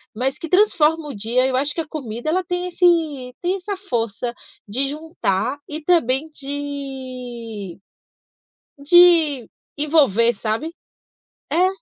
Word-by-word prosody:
mas 260 +5 -1
que 330 - -6
transformam 325 -5 +3
o 280 - -7
dia. 230 +5 +1
Eu 260 -1 0
acho 285 +2 +2
que 330 - -2
a 315 - -8
comida 245 -4 -5
ela 370 +4 +1
tem 355 0 -3
esse 330 -8 +1
tem 360 +2 0
essa 395 +1 -5
força 240 - -3 0.3
de 255 +7 +1
juntar 280 - -2
e 305 +2 -5
também 300 -3 +2
de 260 - -6 1.0
de 315 -5 +5 0.3
envolver, 275 -7 +3
sabe. 225 +10 -3 0.8
É. 350 +5 +4
285 Hz, 125 wpm, -21 LUFS, 245-325 Hz, 1.0 s, de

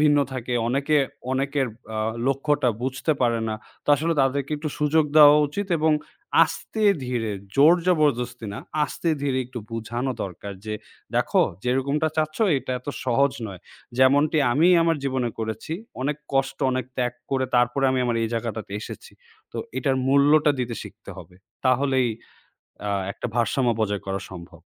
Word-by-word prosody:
ভিন্ন 150 -1 +5
থাকে 125 -1 -4 0.2
অনেকে 140 +4 +1 0.4
অনেকর 135 +1 0 0.3
আ - - -1 0.3
লক্ষ্যটা 140 0 +1
বুঝতে 135 +4 0
পারে 120 -2 +2
না। 110 - -1 0.3
তো - - -23
আসলে 165 +3 0
তাদেরকে 135 +1 0
একটু 155 +1 -4
সুযোগ 150 +1 +3
দেওয়া 150 -1 +9
উচিত 200 +8 -3
এবং 155 0 +3 0.5
আস্তে 220 - -5 0.2
ধীরে 120 -3 -1 0.3
জোর-জবরদস্তি 145 -7 +3
না, 100 - -6 0.3
আস্তে 165 - -3
ধীরে 135 -2 0
একটু 125 0 -7
বুঝানো 120 +3 -3
দরকার 100 +2 -6
যে, 110 0 -3 0.4
"দেখো - - +3 0.2
যেরকমটা 140 +5 +1
চাচ্ছ 155 0 0 0.2
এটা 130 0 -5
এত 125 - -12 0.2
সহজ 130 +2 +2
নয়। 95 -4 -9 0.4
যেমনটি 145 +4 +4
আমি 160 +6 +4
আমার 165 -1 +2
জীবনে 130 -3 0
করেছি। 110 +6 -4 0.3
অনেক 145 +1 -1 0.2
কষ্ট 135 0 0
অনেক 130 -2 -1
ত্যাগ 125 -1 0 0.2
করে 135 -1 +1
তারপরে 125 +3 +2
আমি 130 - +1
আমার 120 -1 0
এই 115 - 0
জায়গাটাতে 110 -3 -4
এসেছি। 455 - -9 0.4
তো - - -7 0.2
এটার 135 -3 +1
মূল্যটা 145 +2 +5
দিতে 120 -1 -2
শিখতে - - -11
হবে। 90 - -12 0.3
তাহলেই 130 -1 +2 0.8
আ - - 0 0.2
একটা - - -5
ভারসাম্য 120 +1 +2
বজায় 105 -2 -1
করা 95 0 -2
সম্ভব।" 85 -2 -11
130 Hz, 155 wpm, -24 LUFS, 120-145 Hz, 0.8 s, দেওয়া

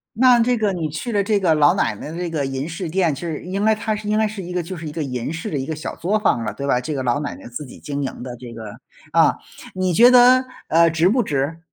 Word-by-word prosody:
那 250 0 +5
这 245 +1 +2
个 210 -3 0
你 165 -4 -3
去 160 +11 -5
了 205 -2 +1
这 205 0 +1
个 175 -5 +3
老 150 -1 +4
奶 - - 0
奶 150 - -8
的 165 - -7
这 175 -1 -3
个 155 -4 -2
银 135 +2 -3
饰 170 +1 -5
店， 175 -2 +1
其 140 - -8
实 165 -3 -4
应 190 +3 -2
该 220 0 +4
它 215 0 -2
是 210 0 -6
应 215 - +2
该 220 0 +2
是 210 -1 -6
一 180 0 -7
个 180 0 -1
就 180 +3 -7
是 160 -2 -7
一 - - -5
个 155 0 -3
银 125 +1 -4
饰 165 0 -5
的 150 - -2
一 135 - -3
个 160 - -4
小 155 - -6
作 195 +5 0
坊 120 - +1
了， 105 -2 -3
对 140 +5 -5
吧？ 125 -2 +2
这 150 +5 -4
个 135 -2 -3
老 125 +3 +1
奶 145 - -4
奶 - - -12
自 125 +5 -7
己 125 - -13
经 145 -1 -4
营 130 - -5
的 125 -1 -6
这 120 -1 -10
个 110 -2 -8 0.4
啊， - - +4 0.4
你 185 -1 0
觉 240 +8 +7
得， 255 +1 +7 0.2
呃， 165 +1 +4
值 165 +2 +2
不 245 +3 +2
值？ 145 -1 -2
165 Hz, 320 characters per minute, -21 LUFS, 140-205 Hz, 0.4 s, 觉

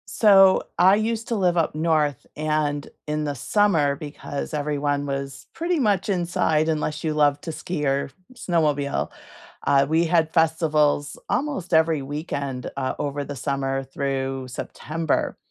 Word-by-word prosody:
So, 195 -3 +6
I 185 +3 +6
used 225 +1 -1
to 235 - 0
live 180 -4 +2
up 160 -2 +1
North, 155 -4 +1
and 150 -1 -1 0.2
in 150 0 -1
the 145 -1 -2
summer, 155 - +2
because 145 0 -6
everyone 145 -1 -1
was 135 -1 -5
pretty 340 0 -1
much 205 -6 +1
inside, 170 -4 +1
unless 155 -1 -2
you 155 -1 0
love 145 -1 +3
to 165 - -5
ski 160 -1 -4
or 135 0 0 0.2
snowmobile, 150 - 0 0.6
uh, 140 0 +5
we 160 +3 +2
had 165 -1 +2
festivals 155 -3 +2
almost 270 - -2
every 160 -2 +3
weekend, 140 -2 -4
uh, 130 -1 -1
over 145 0 -2
the 145 0 -6
summer 135 0 -2
through 135 -1 -3
September. 155 +5 -3
150 Hz, 145 wpm, -24 LUFS, 140-170 Hz, 0.6 s, So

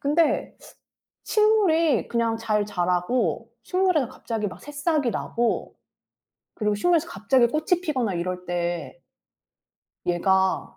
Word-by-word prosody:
근데 300 +3 +1 0.7
식물이 370 - +3
그냥 230 -1 0
잘 215 -2 0
자라고 180 - -1
식물에서 365 -7 +1
갑자기 220 -3 -4
막 180 - -11
새싹이 295 -2 -1
나고 235 +1 -2 0.8
그리고 210 -1 0
식물에서 335 +8 +2
갑자기 235 +6 +2
꽃이 310 +5 0
피거나 255 - -1
이럴 180 +1 -3
때 175 - -3 1.1
얘가 190 +2 +1
230 Hz, 245 characters per minute, -24 LUFS, 190-310 Hz, 1.1 s, 식물이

